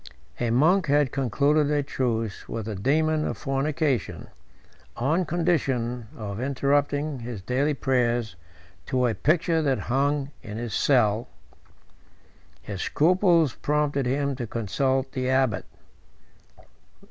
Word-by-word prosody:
A 120 - 0
monk 160 +9 +3
had 145 -2 +3
concluded 145 +3 +1
a 145 -1 +1
truce 115 -6 -2
with 110 -2 -4
the 110 - -4
daemon 155 +9 +1
of - - -3
fornication, 140 0 -1 0.7
on 155 +9 +1
condition 130 -9 0
of 100 -2 -5
interrupting 140 +1 0
his 115 -5 -7
daily 140 +7 0
prayers 120 -6 0 0.5
to 125 -1 +1
a 120 - +1
picture 165 +5 +1
that 135 -4 +1 0.2
hung 140 +1 +1
in 105 -1 -7
his 120 -1 -4
cell. 120 -3 +2 1.4
His 100 -3 -5
scruples 170 -3 +3
prompted 145 -3 0
him 140 +1 0
to 120 -3 -4
consult 130 +5 -1
the 130 -1 -2
abbot. 130 -5 +1
135 Hz, 120 wpm, -25 LUFS, 120-150 Hz, 1.4 s, monk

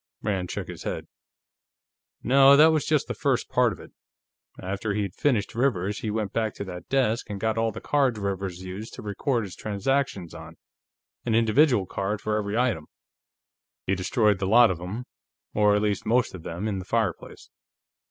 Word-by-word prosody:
Rand 95 -4 -1
shook - - -4
his - - -8
head. - - -4 1.2
"No, 135 +2 +7
that 155 +2 +7
was 155 -2 0
just 150 -3 +1
the - - -3
first - - 0
part - - +3
of - - -8
it. - - -13 0.7
After 100 +2 -3
he'd 100 -4 -2
finished 120 -4 0
Rivers, 105 -6 0
he 110 - -3
went 105 -2 -2
back 110 -2 -1
to - - -5
that 90 -3 -9
desk 125 -5 +1
and 100 -1 -5
got 110 +1 0
all 115 0 +1
the - - -8
cards 135 -6 +1
Rivers 95 -2 -3
used 95 +5 -7
to - - -9
record 115 +4 -1
his 95 - -8
transactions 105 -3 -2
on - - -11 0.7
an 115 - 0
individual 115 0 +4
card 100 +3 -3
for 105 +2 -2
every 105 0 -1
item. 120 -11 0 1.0
He 95 - +1
destroyed 100 +2 +1
the 95 - -1
lot 115 +2 +6
of 85 - -4
them, 100 +8 -6 0.5
or 105 -1 +4
at 105 - +1
least 105 -1 0
most 120 +3 +2
of 95 - -8
them, 85 +6 -4
in 100 -3 -2
the 90 - -7
fireplace. 110 -3 -3
105 Hz, 185 wpm, -26 LUFS, 95-120 Hz, 1.2 s, No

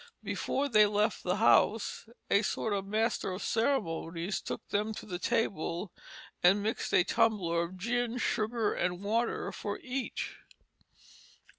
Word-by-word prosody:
Before 280 +1 -1
they 215 -5 +6
left 210 +1 +1
the 180 0 0
house 220 0 +3 0.2
a 200 - +5
sort 220 0 -1
of 195 -1 -2
master 215 -2 0
of 185 - -5
ceremonies 190 -7 -1
took - - -6
them 210 +2 -1
to - - -8
the 180 -4 -5
table 195 -6 -1 0.5
and 195 +3 +5
mixed 220 +2 -2
a - - +5
tumbler 200 -7 +2
of 170 +2 -5
gin, 240 +4 -1
sugar 220 -2 0
and 180 +2 -2
water 230 +3 0
for 205 0 -4
each." 260 0 -4
210 Hz, 140 wpm, -31 LUFS, 185-230 Hz, 0.5 s, they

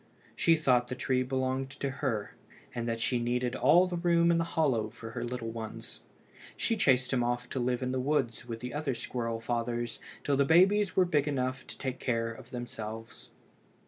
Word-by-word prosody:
She 165 - +4
thought 125 -6 +3
the 125 - -4
tree 130 0 +1
belonged 130 +1 -1
to 140 - -1
her, 115 -8 -1 0.4
and 120 -1 -3
that 115 0 -1
she 120 +2 +1
needed 120 +1 0
all 155 +9 +5
the 180 -1 -3
room 170 -1 +4
in 170 - +3
the - - +2
hollow 135 -10 +1
for 115 0 -9
her - - -4
little 120 -2 -4
ones. 110 -1 -7 0.6
She 230 - +1
chased 130 - +3
him 125 -2 +2
off 120 +1 -1
to 130 - -2
live 125 +1 0
in 130 - -1
the 130 - -1
woods 130 -4 0
with 115 -2 -4
all - - -19
the 125 0 -5
other 145 -3 -1
squirrel 115 -1 -3
fathers 120 0 -2 0.2
till 140 -1 +1
the 140 - +5
babies 185 +6 +4
were 185 - +5
big 150 -4 +1
enough 130 -2 -2
to - - -7
take 130 -2 -4
care 115 -2 0
of 115 - -13
themselves. 115 -3 -7
125 Hz, 205 wpm, -30 LUFS, 120-140 Hz, 0.6 s, all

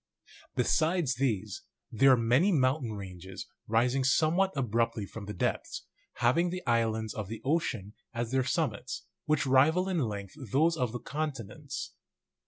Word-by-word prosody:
Besides 155 +3 +2
these, 120 -7 -1 0.3
there 135 +4 +5
are - - +4
many 125 - +3
mountain 130 - +1
ranges 95 -2 -8 0.2
rising 125 +4 +2
somewhat 165 +8 +3
ab 125 -6 -1
ruptly 115 -2 +1
from 110 0 -8
the 105 - -4
depths, - - -2 0.3
having 130 +10 +2
the 180 +1 -5
islands 110 -3 +1
of 110 -3 -5
the 110 +2 -6
oceani 125 - -1 0.2
as 120 -1 -3
their 130 0 +2
summits, 125 - -2 0.2
which 155 -1 +1
rival 150 +8 +4
in 185 -3 0
length 100 -7 -3 0.2
those 160 +4 +3
of 125 -7 -1
the 120 - -4
con 150 +5 -2
tinents. 130 +3 -7
130 Hz, 155 wpm, -30 LUFS, 110-155 Hz, 0.3 s, there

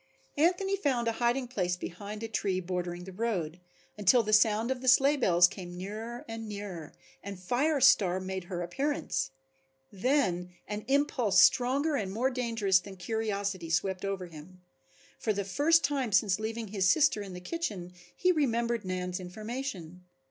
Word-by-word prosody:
Anthony 360 +6 +2
found 265 -11 0
a - - +3
hiding 245 +2 +1
place 180 -7 -1
behind 205 +5 -7
a - - -2
tree 195 -4 -1
bordering 180 -1 -4
the 190 - -9
road, 185 -6 -2 0.4
until 225 +4 +5
the 215 0 -2
sound 220 +3 +4
of 255 -1 -3
the 260 - -5
sleigh 275 +3 +6
bells 180 -10 +5
came 175 -1 -9
nearer 220 +6 -6
and 225 -1 -6
nearer, 195 -7 -7 0.3
and 200 -2 -7
Fire 275 - +1
Star 195 -9 +5
made 190 -1 -5
her 175 0 -4
appearance. 220 - -2 0.6
Then 190 -6 0
an 210 0 -5
impulse 270 -6 +2
stronger 275 +5 +4
and 195 -3 -3
more 245 +6 0
dangerous 225 -7 +1
than 190 +1 -11
curiosity 200 -3 -3
swept 185 +3 0
over 195 -2 -3
him. 175 +2 -13 0.6
For 215 - 0
the 200 -1 -3
first 305 - +3
time 270 -5 0
since 195 0 +3
leaving 220 0 -4
his 190 -3 +1
sister 280 -6 +3
in 195 -2 -7
the 180 - -7
kitchen 185 - -4 0.2
he 365 - +3
remembered 235 -7 0
Nan's 180 -1 -3
information. 185 - -6
210 Hz, 160 wpm, -30 LUFS, 185-250 Hz, 0.6 s, sleigh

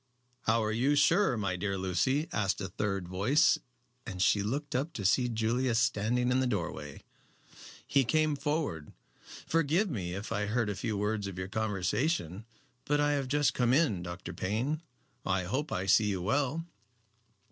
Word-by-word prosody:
"How 115 +1 +3
are 110 - 0
you 130 +6 +2
sure, 165 - +3
my 100 -3 -1
dear 100 +2 -2
Lucy?" 95 - 0
asked 100 -3 0
a 95 - -3
third 100 -1 -2
voice, 105 - +3 0.4
and 95 -7 -7
she 100 +2 +3
looked 140 +8 -3
up 145 +6 -1
to 100 - -5
see 125 +6 +3
Julius 115 +2 0
standing 125 +1 +1
in 130 - +3
the 130 - +1
doorway. 85 - -4 0.8
He 140 -1 +3
came 155 +4 +2
forward. 145 - -2 0.5
"Forgive 165 +5 +1
me 90 -7 -3
if 100 +2 -6
I 105 0 -1
heard 110 -1 0
a - - -4
few 110 +1 -2
words 105 0 -1
of 95 -2 -7
your 95 0 -4
conversation. 110 - -1 0.4
But 145 0 +1
I 145 0 +3
have 140 -2 0
just 145 +2 +2
come 125 -1 +2
in. 130 - +2
Dr. 85 +1 -7
Payne, 120 - -2 0.4
I 95 -1 0
hope 135 - -2
I 95 - -1
see 105 +2 +5
you 95 -3 -2
well." 145 - 0
110 Hz, 170 wpm, -30 LUFS, 100-140 Hz, 0.8 s, see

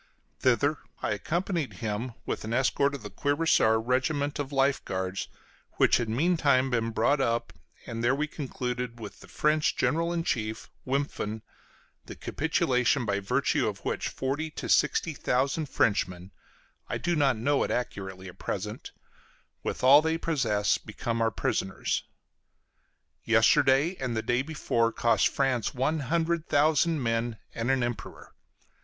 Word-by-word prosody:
Thither 135 +4 +2 0.2
I - - 0
accompanied 170 - -2
him 115 +2 -4
with - - -3
an 110 +1 -4
escort 140 +2 +2
of 130 - -9
the 105 - -7
cuirassier 145 -6 +2
regiment 140 +5 0
of 145 -1 -3
life 135 0 +2
guards, 95 0 -3 0.5
which - - +4
had 120 -2 -2
meantime 140 -1 +2
been 115 -2 0
brought 120 +6 +2
up; 115 -6 -1 0.3
and 115 -1 -5
there 130 +3 +3
we 150 +2 0
concluded 125 -5 -4
with 105 -3 -9
the - - -14
French 150 0 +1
general 165 +2 +1
in 170 -1 -1
chief, 110 -6 -3 0.2
Wimpffen, 130 -6 -2 0.6
the - - -8
capitulation 135 -5 +1
by 100 -1 0
virtue 100 - +1
of - - -5
which - - -1
forty 140 +4 -2
to 155 - -6
sixty 165 - +2
thousand 135 +3 0
Frenchmen, 95 -5 0 0.6
I - - -1
do 175 0 0
not 140 -5 +2
know 140 +5 +1
it - - -2
accurately 95 -6 -4
at 90 - -12
present, 105 +3 -5 0.7
with - - -4
all 140 +3 +8
they 160 +1 0
possess, 125 -12 +1
became 115 +2 -4
our 115 - +3
prisoners. 95 -2 -2 1.2
Yesterday 135 +8 +4
and 125 -4 -2
the 110 - -1
day 120 +1 +1
before 125 -6 0
cost 115 0 +3
France 130 -5 0
one 150 +5 0
hundred 165 +3 0
thousand 155 0 +2
men 115 0 -1 0.2
and 115 +2 -2
an 135 -2 +2
Emperor. 120 -1 -6
130 Hz, 150 wpm, -28 LUFS, 115-145 Hz, 1.2 s, all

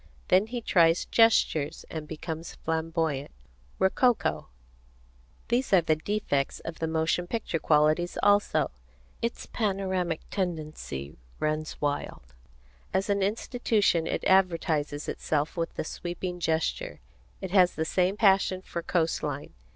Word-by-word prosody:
Then 190 +4 +4
he 240 +1 -4
tries 170 -5 +3
gestures, 225 -10 +3
and 155 -2 -5
becomes 160 +1 -6
flamboyant, 160 -3 -2 0.5
rococo. 190 - +2 1.0
These 240 -1 +1
are 185 - +7
the 160 -1 +2
defects 155 -5 -1
of 165 -1 -7
the 160 - -1
motion 160 +2 0
picture 210 -6 -2
qualities 155 +3 +2
also. 205 - +3 0.5
Its 235 0 -3
panoramic 190 -5 -1
tendency 155 - -4 0.2
runs 155 0 -2
wild. 145 - -3 0.6
As 195 +2 0
an 200 0 +1
institution 205 -4 +1
it - - -2
advertises 165 -6 +2
itself 150 0 -1
with 165 -1 -3
the - - -2
sweeping 175 +2 -5
gesture. 160 -1 -1 0.4
It 190 - -6
has 185 -2 +5
the 160 - -1
same 185 +4 +1
passion 190 -3 +3
for 170 - -5
coast 165 -1 0
line. 145 -1 -4
170 Hz, 125 wpm, -28 LUFS, 155-195 Hz, 1.0 s, are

